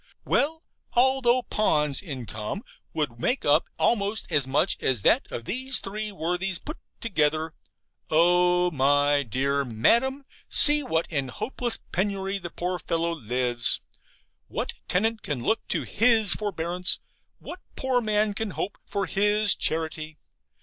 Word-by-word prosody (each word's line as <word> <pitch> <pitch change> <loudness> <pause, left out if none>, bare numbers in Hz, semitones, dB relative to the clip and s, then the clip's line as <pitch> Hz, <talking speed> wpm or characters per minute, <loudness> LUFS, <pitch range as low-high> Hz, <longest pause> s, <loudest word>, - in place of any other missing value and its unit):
Well, 320 +3 0 0.3
although 255 0 +3
Pon's 150 - +1
income 125 - -6 0.3
would 145 -7 -3
make 250 - -1
up - - +4
almost 210 -1 0
as 140 -3 +2
much 135 +2 +1
as 125 -6 0
that - - +2
of 115 - -6
these 260 - 0
three 210 +2 -4
worthies 180 +1 -2
put 305 - -8 0.2
together 155 -6 0 0.6
oh, 180 +2 +3
my 145 0 +2
dear 140 +3 -1
Madam, 235 - +1 0.2
see 295 0 +8
in 280 - -7
what 160 +1 -1
hopeless 155 - -2
penury 195 +1 -2
the 175 - -7
poor 180 +2 -4
fellow 170 0 -1
lives! 125 -3 +1 0.7
What - - -3
tenant 220 +4 0
can 135 -5 -4
look 220 - -1
to - - -1
HIS 225 -2 +3
forbearance? 180 -3 -2 0.4
What - - -10 0.2
poor 260 -2 0
man 215 -1 0
can 220 +1 -3
hope 205 - -4
for 200 -1 -2
HIS 210 +1 +3
charity? 160 -1 -3
180 Hz, 135 wpm, -25 LUFS, 145-220 Hz, 0.7 s, see